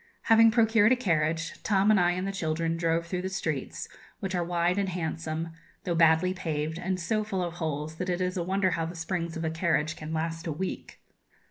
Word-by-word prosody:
Having 225 0 +6
procured 225 -1 +4
a - - +6
carriage, 165 -7 0
Tom 200 0 +3
and 210 - +5
I 175 0 +3
and 185 +1 -2
the - - -1
children 165 -3 -1
drove 165 0 0
through 180 +1 -3
the 190 - -3
streets, 155 -8 -3 0.3
which 190 -1 -3
are 175 -1 +1
wide 175 +2 +1
and 195 -1 0
handsome, 165 -2 -3 0.3
though 175 - -1
badly 165 +2 +4
paved, 160 -3 -3
and 185 +1 -2
so 215 +5 0
full 195 -4 -2
of 170 -1 -3
holes 155 -2 -4
that 180 +2 -3
it 175 0 0
is 185 0 -1
a 180 - -1
wonder 190 +1 +1
how 165 -1 -1
the 170 - -7
springs 170 0 -3
of 165 - -3
a 160 - 0
carriage 160 -2 0
can 155 0 -7
last 165 +1 -3
a - - -1
week. 180 +5 -5
170 Hz, 220 wpm, -28 LUFS, 160-190 Hz, 0.3 s, Having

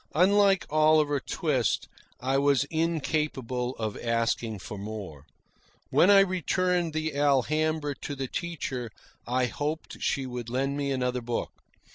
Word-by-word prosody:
Unlike 195 +2 +4
Oliver 155 -1 +4
Twist, 135 -4 0 0.3
I 135 +2 +1
was 140 -2 +3
incapable 150 -6 -1
of 110 -2 -3
asking 115 -1 0
for 100 +2 -8
more. 100 -9 -7 0.6
When 185 - +5
I 200 -1 +8
returned 180 -2 0
the 155 0 -2
"Alhambra" 145 +2 +1
to 145 +1 -6
the 135 -1 -3
teacher 135 -8 -4 0.4
I 125 +1 +1
hoped 150 +5 -4
she 135 - 0
would 125 -2 -5
lend 135 +3 -1
me 140 -1 -1
another 125 -1 -1
book. 120 0 -3
140 Hz, 130 wpm, -28 LUFS, 125-155 Hz, 0.6 s, I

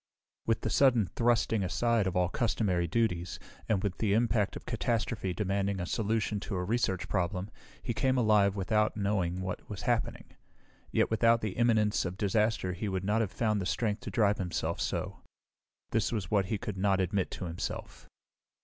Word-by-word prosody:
With 115 - +1
the 110 - -2
sudden 120 -3 +4
thrusting 115 0 +1
aside 115 +3 +1
of 95 - -2
all 90 -1 +3
customary 95 -4 0
duties, 90 -4 0 0.3
and 100 -3 +1
with 100 -3 -2
the 105 -3 +2
impact 110 -2 +1
of - - -8
catastrophe 115 -4 -1
demanding 100 0 -1
a 90 - -2
solution 110 +1 0
to 100 - -5
a 90 - -1
research 95 -2 0
problem, 95 +2 -1 0.3
he 120 - -2
came 130 +2 +1
alive 105 -4 +4
without 105 +3 +1
knowing 95 -3 0
what 95 -1 -5
was - - -6
happening. - - -1 0.6
Yet - - +2
without 115 +1 +4
the 110 - -2
imminence 110 -2 +2
of 90 0 -4
disaster 105 -2 +1
he 100 +4 -3
would 95 -1 -2
not 105 +3 +2
have 105 -5 -1
found 110 -3 0
the 90 - -2
strength 105 -1 -1
to - - -6
drive 105 -3 +2
himself 85 -2 -2
so. - - -2 0.7
This 110 -2 +1
was 105 -7 -3
what 100 -3 +3
he 105 +3 -1
could 105 -2 -5
not 95 -1 +2
admit 95 +1 0
to 95 - -4
himself. 85 0 -6
105 Hz, 180 wpm, -30 LUFS, 95-115 Hz, 0.7 s, sudden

